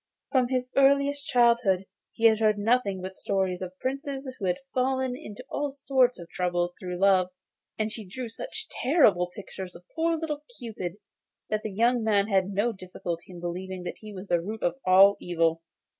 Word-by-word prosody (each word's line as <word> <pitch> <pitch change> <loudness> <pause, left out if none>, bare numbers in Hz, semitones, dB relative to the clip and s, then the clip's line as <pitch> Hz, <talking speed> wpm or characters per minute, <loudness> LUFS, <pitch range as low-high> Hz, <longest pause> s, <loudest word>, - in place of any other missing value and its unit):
From 255 -2 +3
his 255 0 -1
earliest 280 +1 +3
childhood 235 -6 +3 0.3
he 230 - -1
heard 220 -1 +5
nothing 205 -3 +1
but 190 0 -6
stories 190 -2 -1
of 185 0 -6
princes 275 +2 -3
who 195 - -3
had 180 -1 +1 0.2
fallen 260 0 +1
into 230 0 -9
all 290 0 -2
sorts 270 -2 +2
of 170 - -9
troubles 175 -1 0
through 180 -1 -4
love; 185 -1 +4 0.5
and 215 0 -1
she 220 - -5
drew 235 +6 -6
such 440 - -7
terrible 245 - +3
pictures 180 0 -8
of 175 +1 -13
poor 330 0 +1
little 300 -2 -4
Cupid 205 -8 -5 0.6
that 215 0 +1
the 220 - -4
young 235 +4 +2
man 205 -1 +2
had 190 -2 +2
no 205 +4 +1
difficulty 180 -3 -6
in 175 - -9
believing 180 +1 -5
that 175 - -6
he 215 -1 -10
was 195 0 -8
the 175 -2 +2
root 215 +5 -6
of 175 - +2
all 195 +2 +7
evil. 165 -2 +1
210 Hz, 180 wpm, -27 LUFS, 185-255 Hz, 0.6 s, all